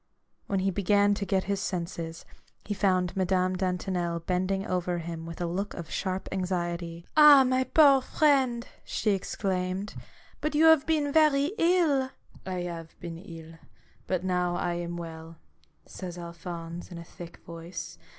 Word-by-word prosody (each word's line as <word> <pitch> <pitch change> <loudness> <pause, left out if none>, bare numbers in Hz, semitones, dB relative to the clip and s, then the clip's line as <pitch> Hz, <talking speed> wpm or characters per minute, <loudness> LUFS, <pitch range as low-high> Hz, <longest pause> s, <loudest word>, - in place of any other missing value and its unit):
When 195 -1 0
he 195 +1 +1
began 205 +2 +3
to 200 -1 -3
get 190 -2 +1
his 200 0 -1
senses, 170 -3 -4 0.4
he 205 - -2
found 185 -3 +1
Madame 185 0 +1
Dantonel 180 -2 -1
bending 185 +3 -1
over 180 -1 -1
him 165 -1 -6
with 165 - -8
a 175 - -1
look 190 +4 -3
of 170 -3 -8
sharp 190 -1 -2
anxiety. 175 -2 -3
" - - -40
Ah, 300 -3 +9
my 255 0 +1
poor 280 -3 +6
friend! 260 -4 +2
" - - -31
she 215 - 0
exclaimed, 190 0 -2 0.2
" - - -27
but 305 0 -1
you 315 +2 +5
have 320 -2 +6
been 300 -3 +1
very 300 -1 +4
ill! 330 -7 +3
" - - -37
" - - -23
I - - -2
have 170 -2 -7
been 170 -1 -7
ill, 165 -3 -11 0.5
but 185 -1 -1
now 180 -1 0
I 175 0 -1
am 175 0 -4
well," 165 -1 -8 0.5
says 180 -2 -8
Alphonse, 170 0 -7
in 175 - -7
a 170 - -7
thick 170 0 -11
voice. 170 - -8
185 Hz, 170 wpm, -28 LUFS, 170-205 Hz, 0.5 s, Ah